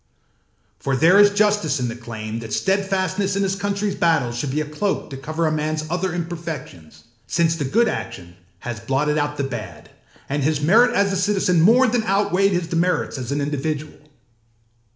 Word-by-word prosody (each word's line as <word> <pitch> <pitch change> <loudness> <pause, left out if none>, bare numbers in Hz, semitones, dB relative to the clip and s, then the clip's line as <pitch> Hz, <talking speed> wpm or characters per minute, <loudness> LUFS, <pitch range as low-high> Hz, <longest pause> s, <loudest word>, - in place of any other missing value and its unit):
For 135 - -1
there 170 +8 +5
is 205 0 +8
justice 205 -8 +1
in 125 - -1
the 115 - -5
claim 115 -2 -6
that 115 -1 -8
steadfastness 195 0 0
in 200 - +1
his 195 0 0
countryâs 200 0 -2
battles 160 -8 +2
should 130 +3 -3
be 145 +4 -1
as 155 - -1
a - - -11
cloak 195 0 -2
to - - -5
cover 155 +4 -2
a 155 - +1
manâs 155 0 -2
other 180 +1 -1
imperfections; 160 - -7 0.2
since 165 +1 +1
the 150 -4 -3
good 230 - +2
action 85 - -5 0.3
has 120 -3 -5
blotted 140 +6 0
out 145 0 -2
the 140 - -1
bad, 120 -5 -7 0.4
and 145 +1 -2
his 150 0 +1
merit 230 +11 +4
as 200 -2 +2
a - - 0
citizen 185 -3 +2
more 235 +9 +6
than 245 -1 +1
outweighed 195 0 +2
his 175 -2 0
demerits 170 -3 -1
as 125 0 -5
an 145 +1 -1
individual. 150 +1 -3
160 Hz, 190 wpm, -21 LUFS, 140-195 Hz, 0.4 s, is